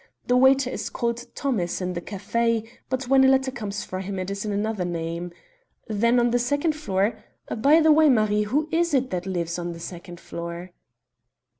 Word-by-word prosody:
The 245 - +2
waiter 265 0 +4
is - - -4
called 235 0 -3
'Thomas' 215 -11 -1
in 180 -1 -2
the 170 - -4
café, 225 +4 -1 0.2
but 260 0 -2
when 265 +1 +5
a - - +6
letter 265 0 +3
comes 210 -4 -5
for 185 - -5
him 195 +1 -5
it 185 +1 -3
is 200 0 -4
in 210 - -2
another 205 -1 -1
name. 170 0 -4 0.6
Then, 235 +3 +2
on 240 0 +2
the 245 - +2
second 285 +6 +1
floor 215 -6 -1 0.3
by 285 +8 +5
the 315 0 +5
way, 310 0 +6
Marie, 215 -4 +3
who 295 +8 0
is 335 -2 +2
it 260 -1 +1
that 180 +1 -3
lives 175 -2 -2
on 175 0 -4
the 165 - -10
second 175 0 -9
floor?" 170 +1 -7
220 Hz, 195 wpm, -24 LUFS, 185-260 Hz, 0.6 s, a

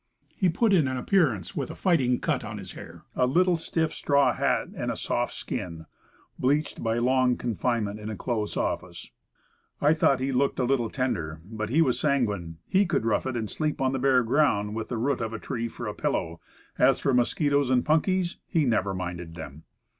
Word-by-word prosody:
He 185 - +2
put 205 +5 +2
in 160 -7 +4
an 130 0 -2
appearance 125 - +1
with - - -2
a - - -7
fighting 135 -9 +2
cut 150 -7 -1
on 110 -1 -6
his 95 -3 -8
hair, - - -11
a 125 - +2
little 180 +6 +3
Stiff 160 -1 -1
straw 140 -1 +2
hat, - - 0
and - - -3
a - - -1
soft - - -1
skin, 80 -3 -5 0.5
bleached 145 +4 0
by 115 0 0
long 125 +1 +2
confinement 115 -2 -1
in 105 0 -6
a 110 - -4
close 110 0 -2
office. - - -3 0.7
I 150 +2 +4
thought 140 -4 +3
he 135 +1 -1
looked 135 +2 +1
a 130 - +1
little 120 -3 +1
tender; 85 - -2
but 110 +1 -5
he 160 +7 +4
was 130 -5 0
sanguine. 105 - 0
He 195 +1 +2
could 115 - 0
rough 115 +3 +1
it, 130 - -2
could 110 -3 -3
sleep 155 -1 -2
on 130 -1 +1
the 135 - -2
bare 130 -1 +4
ground 110 -5 +2
with 110 0 -4
the 120 - -2
root 130 +2 0
of 115 0 -3
a 115 - -4
tree 115 -1 -3
for 120 +1 -7
a 105 - -3
pillow; 85 -4 -2 0.4
as - - +5
for 135 - +1
mosquitoes 140 +2 +2
and 125 -1 +2
punkies, 175 +3 +1
he 160 -3 +1
never 100 -5 +1
minded 90 -2 -5
them. 75 -2 -9
125 Hz, 205 wpm, -27 LUFS, 110-145 Hz, 0.7 s, as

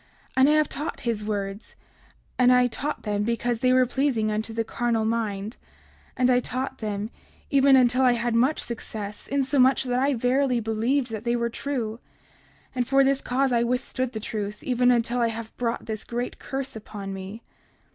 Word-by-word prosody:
And 265 +2 +5
I - - +5
have 305 -1 +3
taught 300 +4 -5
his 230 -3 -2
words; 200 0 -4 0.6
and 250 0 +6
I 250 0 +5
taught 280 +5 -3
them 205 -1 -1
because 235 +1 -1
they 255 +1 +3
were 255 0 +5
pleasing 245 -4 0
unto 215 +1 -2
the 225 0 -1
carnal 230 -1 -1
mind; 220 -1 -2 0.6
and 250 -1 +3
I 250 - +4
taught 260 +2 -4
them, 210 0 -3 0.4
even 275 -1 +6
until 250 0 +4
I 250 -2 +5
had 235 0 -1
much 255 +6 +2
success, 210 -3 -6
insomuch 270 -1 +3
that 250 -1 0
I 275 +1 +2
verily 250 +1 +2
believed 230 +4 0
that 220 -1 -5
they 240 0 +1
were 235 0 -1
true; 230 -5 -3 0.7
and 250 -2 -1
for 275 +1 +4
this 275 0 +2
cause 265 +1 0
I 235 -1 +3
withstood 250 +1 -1
the 220 - -3
truth, 210 -1 -5
even 250 -1 +2
until 240 0 +2
I 235 - +3
have 225 0 -6
brought 235 -1 -2
this 220 -1 -4
great 240 +1 -4
curse 270 -1 -4
upon 205 -2 -7
me. 195 +4 -8
240 Hz, 185 wpm, -25 LUFS, 220-260 Hz, 0.7 s, and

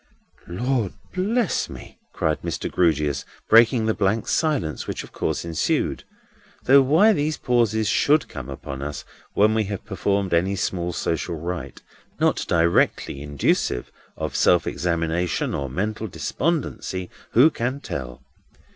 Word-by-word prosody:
"Lord 115 +3 -1 0.2
bless 210 +3 0
me," - - -11
cried 75 -1 -1
Mr. - - -3
Grewgious, 75 -5 +1 0.2
breaking 115 +1 +5
the 110 - +2
blank 105 +2 0
silence 145 - 0
which - - -4
of - - -13
course - - -2
ensued: 80 -2 -1 0.6
though 140 +2 +7
why 165 +12 +5
these 150 -3 -1
pauses 110 -3 +1
should 150 +8 +3
come 65 -4 -8
upon 70 0 -7
us 70 -2 -5 0.3
when 105 +2 +4
we 110 -1 +1
have 100 -1 -5
performed 100 -2 -1
any 95 +4 +2
small 90 -2 -2
social 85 0 -2
rite, 85 +2 -6 0.4
not - - +2
directly 85 -4 +2
inducive 70 -3 0 0.3
of - - -4
self 85 -1 +4
examination 85 0 -1
or 70 -1 -3
mental 105 - -2
despondency, 115 - -2 0.2
who 140 +8 +6
can 130 +2 -2
tell? 65 - -6
95 Hz, 135 wpm, -23 LUFS, 80-125 Hz, 0.6 s, though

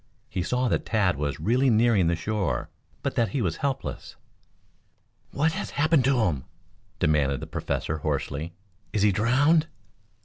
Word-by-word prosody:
He 95 - -2
saw 125 +7 0
that - - 0
Tad 100 -5 +2
was 70 0 -3
really 125 - +2
nearing 110 -5 +4
the 85 - +2
shore, 100 +2 -2 0.3
but - - -1
that 115 -3 +1
he 125 - -2
was 85 -4 -1
helpless. 135 -1 -4 1.1
"What 160 +4 +1
has - - -4
happened 145 -2 +2
to 135 -3 +3
him?" 80 -11 0 0.5
demanded 70 -3 +2
the - - -6
Professor 80 0 -3
hoarsely. 80 +4 -3 0.4
"Is 105 -2 +1
he 105 - +5
drowned?" 140 - +3
110 Hz, 150 wpm, -26 LUFS, 85-130 Hz, 1.1 s, he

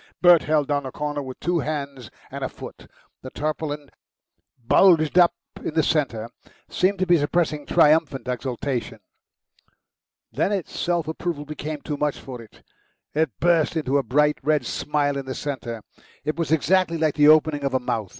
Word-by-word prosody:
Bert 175 -3 +7
held 150 -2 +1
down 145 -1 0
a - - -7
corner 150 +1 -3
with 130 -2 -8
two 175 +1 0
hands 140 -6 -4 0.2
and - - -6
a - - -2
foot. - - -11 0.3
The 130 - -8
tarpaulin, 150 0 -4 0.7
bulged 165 +3 +5
up 175 -1 +5 0.3
in 155 - -4
the 160 - +3
centre, 130 -9 0 0.4
seemed 195 +2 +1
to 185 - 0
be 175 -2 +4
suppressing 150 0 -1
triumphant 155 -5 +3
exultation. 125 -2 -3 1.3
Then 195 - 0
its 195 -4 -4
self 170 -3 -1
approval 160 -2 -4
became 150 0 -6
too 150 - -4
much 150 -1 -1
for 125 -3 -9
it; 110 - -17 0.5
it 155 0 +1
burst 170 -1 +2
into 140 -2 +1
a - - -2
bright 150 +3 +2
red 150 -2 +1
smile 145 0 -1
in 135 -1 -6
the 130 - -4
centre. 120 -6 -5 0.4
It 155 +2 -2
was 165 -2 -3
exactly 170 +2 +2
like 155 -2 +1
the 145 0 +4
opening 155 -1 +4
of 140 -1 -1
a - - +3
mouth. 115 -5 -3
150 Hz, 170 wpm, -23 LUFS, 140-160 Hz, 1.3 s, Bert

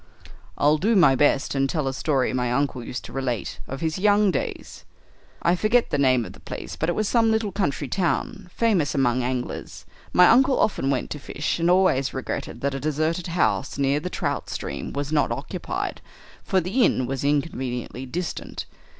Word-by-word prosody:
"I'll 150 +1 +3
do 220 +6 +2
my 170 -9 +6
best, 140 +1 +2
and 135 -1 +1
tell 150 -3 -1
a 135 - -1
story 135 -3 0
my 125 -1 0
uncle 130 -1 0
used 125 - -6
to - - -10
relate 130 -5 -3
of 135 +1 -6
his 160 +1 -1
young 205 0 +4
days. - - -5 0.6
I 170 - +4
forget 230 +6 +2
the 145 - +1
name 130 -4 +3
of - - -9
the - - -15
place, - - -7
but 160 - -1
it 175 - 0
was 215 - 0
some 230 0 +3
little 220 -2 +1
country 150 -7 -1
town 180 +1 -1
famous 185 -11 +1
among 130 -2 +2
anglers. 125 0 -4 0.3
My 180 - +7
uncle 260 +3 +5
often 135 -10 +1
went 135 -2 -1
to 150 - -4
fish, 145 +4 -3
and 170 +1 +2
always 180 -9 +3
regretted 130 - -4
that 140 0 0
a 135 - -3
deserted 155 +5 -1
house 165 -5 0
near 140 +1 +2
the 180 - -4
trout - - -3
stream - - -5
was 145 +1 -3
not 150 -2 +2
occupied, - - -4 0.4
for 190 - +2
the 195 +9 +1
inn 130 - +2
was 135 +2 -3
inconveniently 130 -4 -2
distant. 175 +5 -5
145 Hz, 190 wpm, -24 LUFS, 135-180 Hz, 0.6 s, My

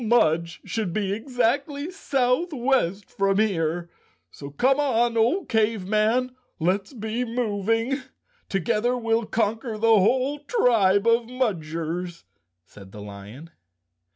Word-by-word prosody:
"Mudge 170 -7 +2
should 210 -6 -3
be 200 -1 -1
exactly 275 - -1
southwest 260 - 0
from 195 0 0
here, 175 -5 0 0.4
so 140 - -9
come 260 - +2
on, 240 -4 +2
old 245 - +2
Cave 220 -3 +1
Man, 220 +5 +1 0.2
let's 190 +4 0
be 225 0 -3
moving. 225 +2 -1 0.5
Together 220 +6 0
we'll 225 -2 0
conquer 225 +1 -1
the 225 0 +4
whole 260 +8 +1
tribe 225 - +2
of 230 0 +3
Mudgers," 175 -7 -3 0.4
said 95 0 -15
the 105 - -10
lion. 105 +10 -11
225 Hz, 115 wpm, -24 LUFS, 185-250 Hz, 0.5 s, the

